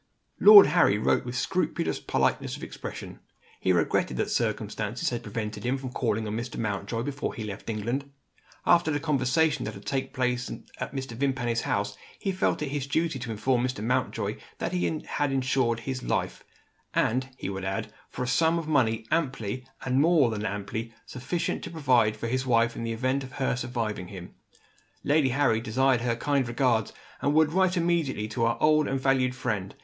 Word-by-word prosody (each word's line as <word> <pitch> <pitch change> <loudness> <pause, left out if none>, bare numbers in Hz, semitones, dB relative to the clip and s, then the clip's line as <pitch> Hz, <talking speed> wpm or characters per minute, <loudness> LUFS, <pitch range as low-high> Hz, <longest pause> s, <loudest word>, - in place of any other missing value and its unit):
Lord 205 -1 +11
Harry 145 - +4
wrote 110 - +1
with 125 0 -4
scrupulous 170 +2 -1
politeness - - 0
of - - -11
expression. - - -7 0.4
He 95 - +2
regretted 80 -7 +1
that - - -1
circumstances 110 +4 -1
had 120 -1 -3
prevented 105 0 -5
him 125 +3 0
from 130 -1 -6
calling 115 -3 -1
on 105 0 -3
Mr. 120 +1 -5
Mountjoy, 110 +1 -2
before 145 +1 -3
he 110 - -5
left 105 +1 -7
England. 120 +6 -2 0.6
After 170 -2 +4
the 145 -1 0
conversation 150 +1 +1
that - - -5
had - - -12
taken 135 -1 -2
place 125 -2 -1 0.3
at - - -5
Mr. 135 -2 -4
Vimpany's 120 -2 -1
house, - - -1 0.2
he 195 - -2
felt 185 -4 0
it 145 - -3
his 140 -1 -3
duty 160 -1 0
to 120 0 -6
inform 120 +3 +1
Mr. 125 -5 -2
Mountjoy 125 +3 -1 0.2
that - - -3
he 85 -3 -1
had 145 -1 -1
insured 130 -3 +1
his 130 +1 -4
life - - -2 0.5
and, 130 +3 +1
he 95 - -4
would 95 -1 -5
add, 95 0 -3 0.2
for - - -4
a - - -3
sum 160 +6 +3
of 165 -2 -4
money 115 -7 +2
amply, 130 -6 -1 0.2
and 130 +1 +2
more 155 -6 +4
than 105 -1 -3
amply, 105 +3 -4
sufficient 130 +7 -3
to - - -5
provide 125 -10 +2
for 115 - -5
his 130 +3 0
wife 115 -2 +2
in - - -5
the 115 - -2
event 130 +4 0
of 130 -1 -10
her 135 -3 0
surviving 115 -6 -3
him. 90 -3 -9 0.7
Lady 145 -2 +3
Harry 125 -4 +2
desired 125 +2 +2
her 120 -1 0
kind 135 +1 0
regards, 120 -3 +1 0.3
and 145 +1 +1
would 155 0 +4
write 185 0 +3
immediately 165 -10 0
to 115 +1 -1
her 115 0 +1
old 155 0 +4
and 135 - -1
valued 130 -1 +2
friend. 105 -7 -3
125 Hz, 185 wpm, -27 LUFS, 115-140 Hz, 0.7 s, Lord